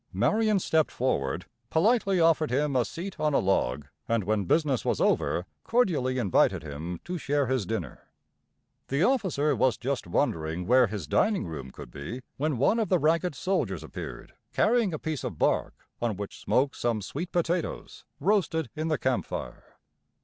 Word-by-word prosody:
Marion 215 Hz, -1 st, +2 dB
stepped 160 Hz, -4 st, +2 dB
forward, 70 Hz, -, -1 dB, 0.2 s
politely 195 Hz, +1 st, +3 dB
offered 165 Hz, -2 st, +4 dB
him 140 Hz, +2 st, 0 dB
a 125 Hz, -, +4 dB
seat 180 Hz, -, -7 dB
on 150 Hz, -2 st, +1 dB
a -, -, +6 dB
log, 75 Hz, -7 st, +1 dB, 0.2 s
and, 115 Hz, -2 st, +1 dB
when 105 Hz, 0 st, 0 dB
business 145 Hz, -, +2 dB
was -, -, 0 dB
over, 90 Hz, -, +1 dB, 0.2 s
cordially 160 Hz, -, +1 dB
invited 100 Hz, -10 st, +2 dB
him 80 Hz, +4 st, -6 dB
to 180 Hz, 0 st, -4 dB
share 145 Hz, -1 st, +1 dB
his 130 Hz, -7 st, -1 dB
dinner. 90 Hz, -, -5 dB, 0.8 s
The 140 Hz, +5 st, +1 dB
officer 190 Hz, -, +2 dB
was 130 Hz, -1 st, +2 dB
just 130 Hz, -4 st, -3 dB
wondering 80 Hz, 0 st, -1 dB
where 125 Hz, +2 st, +5 dB
his 100 Hz, -5 st, -5 dB
dining 205 Hz, -, +2 dB
room 75 Hz, -6 st, -6 dB
could -, -, -11 dB
be, 95 Hz, -, -6 dB, 0.2 s
when 150 Hz, -1 st, 0 dB
one 175 Hz, -, +3 dB
of 215 Hz, -5 st, 0 dB
the 185 Hz, -, +4 dB
ragged 165 Hz, +1 st, +1 dB
soldiers 190 Hz, +8 st, -1 dB
appeared, -, -, -8 dB, 0.2 s
carrying 225 Hz, -3 st, +3 dB
a 155 Hz, -, -2 dB
piece 155 Hz, -1 st, -4 dB
of -, -, -4 dB
bark -, -, +1 dB, 0.3 s
on 115 Hz, -3 st, 0 dB
which 100 Hz, -1 st, -6 dB
smoked 135 Hz, +2 st, +1 dB
some 115 Hz, -4 st, 0 dB
sweet 160 Hz, -, -5 dB
potatoes, 175 Hz, 0 st, -2 dB, 0.2 s
roasted 165 Hz, -, +1 dB
in 155 Hz, +1 st, -2 dB
the 155 Hz, -2 st, +1 dB
camp 130 Hz, -1 st, 0 dB
fire. -, -, -7 dB
140 Hz, 170 wpm, -28 LUFS, 110-170 Hz, 0.8 s, a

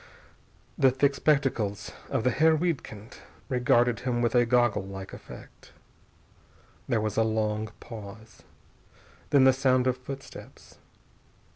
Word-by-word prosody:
The 135 Hz, -, +6 dB
thick 135 Hz, +2 st, +1 dB
spectacles 135 Hz, -, 0 dB, 0.2 s
of -, -, -1 dB
the 125 Hz, -, +2 dB
Herr 160 Hz, +4 st, +4 dB
Wiedkind 130 Hz, -, -4 dB, 0.3 s
regarded 120 Hz, -2 st, +2 dB
him 125 Hz, -2 st, -2 dB
with 120 Hz, -1 st, 0 dB
a 120 Hz, -1 st, +3 dB
gogglelike 100 Hz, -6 st, 0 dB
effect. -, -, -13 dB, 1.2 s
There 115 Hz, -, +2 dB
was 110 Hz, -1 st, -3 dB
a 115 Hz, -, +4 dB
long 110 Hz, -1 st, -1 dB
pause. 110 Hz, -1 st, -11 dB, 0.9 s
Then 140 Hz, -2 st, +5 dB
the 130 Hz, 0 st, +6 dB
sound 130 Hz, -1 st, +2 dB
of 130 Hz, -1 st, +1 dB
footsteps. 135 Hz, +2 st, -11 dB
120 Hz, 120 wpm, -27 LUFS, 110-130 Hz, 1.2 s, The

